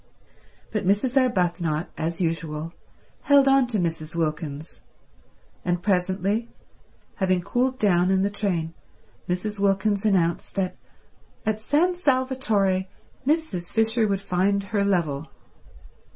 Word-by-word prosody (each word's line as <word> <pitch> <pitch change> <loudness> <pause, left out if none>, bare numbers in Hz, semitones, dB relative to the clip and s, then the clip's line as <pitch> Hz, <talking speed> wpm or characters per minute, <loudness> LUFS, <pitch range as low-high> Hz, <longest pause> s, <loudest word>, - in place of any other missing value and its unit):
But 210 -2 -1
Mrs. 205 +7 +1
Arbuthnot, 175 - +1
as 165 +1 -3
usual, 165 -1 -2 0.5
held 280 -1 +5
on 270 -2 +5
to 230 -3 -1
Mrs. 165 -3 -2
Wilkins; 155 -2 -3 0.8
and 175 0 -1
presently, 195 +3 0 0.7
having 185 -3 +2
cooled 255 +6 0
down 180 -5 +3
in 190 0 +3
the 200 - 0
train, 175 -6 -1 0.6
Mrs. 200 +3 -2
Wilkins 200 +1 +1
announced 180 -5 +1
that 190 -2 -1 0.7
at 215 0 -1
San 320 +10 +2
Salvatore 255 - +1 0.4
Mrs. 290 - 0
Fisher 225 0 +2
would 195 -1 -1
find 195 +1 +1
her 200 +1 -1
level. 160 -7 0
195 Hz, 115 wpm, -24 LUFS, 175-220 Hz, 0.8 s, held